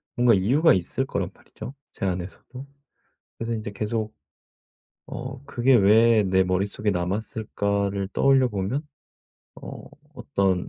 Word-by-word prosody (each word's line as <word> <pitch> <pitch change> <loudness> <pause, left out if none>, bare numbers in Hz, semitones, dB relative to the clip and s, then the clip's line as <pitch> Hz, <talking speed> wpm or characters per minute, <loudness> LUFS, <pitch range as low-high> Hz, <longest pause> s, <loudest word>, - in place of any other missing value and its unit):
뭔가 120 -2 +5
이유가 135 - +4
있을 90 -2 -1
거란 - - -2
말이죠 130 - -10 0.2
제 - - -5
안에서도. 95 +8 -5 0.7
그래서 115 0 -3
인제 110 -2 -4
계속 110 +2 -3 0.9
'어 130 +1 -7
그게 130 -1 +3
왜 110 +1 +5
내 95 -1 +3
머릿속에 100 +3 -1
남았을까?'를 100 +1 -2
떠올려 135 -2 +4
보면 105 +8 -2 0.8
어 - - -8 0.3
어떤 95 -11 0
105 Hz, 260 characters per minute, -25 LUFS, 95-120 Hz, 0.9 s, 뭔가